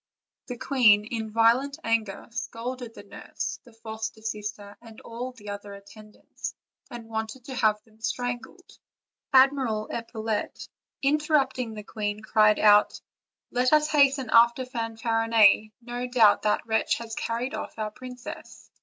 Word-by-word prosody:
The 245 - -6
queen, 225 -6 +4
in 220 -1 -4
violent 235 +6 +3
anger, 225 -3 -1
scolded 240 +1 -5
the - - -11
nurse, 200 - -6
the 240 - -16
foster 220 -1 -7
sister, 210 -2 -5
and 225 -2 -13
all 240 +2 -6
the 240 -5 -18
princess' 205 -1 -5
other 205 0 -11
attendants, 210 +2 -10 0.3
and 235 -2 -9
wanted 220 +2 -5
to 275 - -7
have 215 -4 +2
them 220 0 -26
strangled. 245 +9 -5 0.5
Admiral 260 -5 +3
Epaulette, 225 -2 -4 0.4
interrupting 275 -5 +1
the 210 - -7
queen, 210 0 -4
cried 215 -1 +4
out: 210 -1 +5 0.5
"Let 250 +3 +2
us 305 0 +4
hasten 275 -4 +3
after 235 +2 +5
Fanfarinet; 225 -3 +2
no 245 +1 -4
doubt 230 -5 +5
that 210 +2 0
wretch 220 -1 +1
has 230 -1 -7
carried 235 +3 -3
off - - -6
our 215 -1 -3
princess." 250 +2 -10
230 Hz, 140 wpm, -26 LUFS, 215-250 Hz, 0.5 s, out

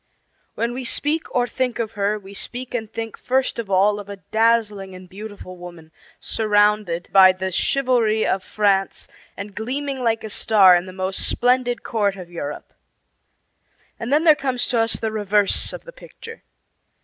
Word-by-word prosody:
When 235 +1 -1
we 255 +1 -5
speak 295 +6 0
or 245 -1 +1
think 250 0 -2
of 225 -2 -3
her 205 0 -1
we 200 -1 -12
speak 250 +5 -5
and 225 -3 -4
think 225 -1 -6
first 260 -1 0
of 220 -4 -5
all 200 +2 +3
of 205 0 -10
a 200 - -5
dazzling 210 -2 0
and 185 0 -12
beautiful 200 -1 -10
woman 175 -3 -12 0.3
surrounded 205 -5 +1
by 190 -1 +7
the 190 0 -4
chivalry 235 -1 +1
of 190 0 0
France 195 -2 0 0.3
and 200 +1 -7
gleaming 265 +6 -4
like 225 -2 0
a 220 - -6
star 200 -4 +5
in 175 +1 -1
the - - -8
most 190 +1 -2
splendid 245 -1 +1
court 205 -4 0
of 180 -2 -10
Europe. 150 -4 -7 1.3
And 230 +3 -4
then 300 +3 +3
there 320 -2 +7
comes 260 -4 -2
to 240 - +1
us 225 0 +2
the 220 - -2
reverse 210 -1 +1
of - - -8
the - - -12
picture. 460 -2 -12
215 Hz, 175 wpm, -21 LUFS, 195-245 Hz, 1.3 s, by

